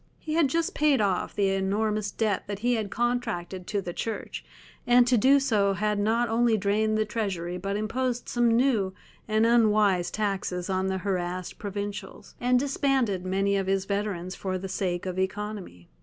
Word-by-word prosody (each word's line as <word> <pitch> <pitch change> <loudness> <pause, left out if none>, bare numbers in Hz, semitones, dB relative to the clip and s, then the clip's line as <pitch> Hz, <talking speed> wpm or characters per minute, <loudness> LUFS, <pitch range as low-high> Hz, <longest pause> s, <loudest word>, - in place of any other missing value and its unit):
He 310 - -5
had 325 -2 +4
just 330 +4 -1
paid 295 -3 +3
off 195 -4 0
the 200 -1 +2
enormous 205 +2 0
debt 210 -2 -1
that 205 -1 -4
he 245 - +3
had 220 -3 -1
contracted 190 -7 -2
to 205 -2 -1
the 175 - -5
Church, 225 +3 -5 0.4
and 245 0 +6
to 245 +1 +3
do 270 +5 +5
so 210 -7 +2
had 210 +1 0
not 225 +3 +2
only 230 0 +2
drained 215 +2 +1
the 215 - +1
treasury 185 -5 -3
but 195 +2 -3
imposed 245 +3 -2
some 240 -1 +2
new 230 -6 +2 0.3
and 215 0 +2
unwise 210 -6 +3
taxes 195 -3 -2
on 190 0 0
the 190 0 -1
harassed 180 -2 -3
provincials, 205 0 -6
and 250 +1 +3
disbanded 265 -7 +1
many 195 +2 +1
of 195 -1 -1
his 195 0 +1
veterans 200 -3 -2
for 185 -1 -3
the 190 +1 -5
sake 180 -2 -2
of 185 0 -3
economy. 190 - -4
205 Hz, 175 wpm, -27 LUFS, 190-230 Hz, 0.4 s, and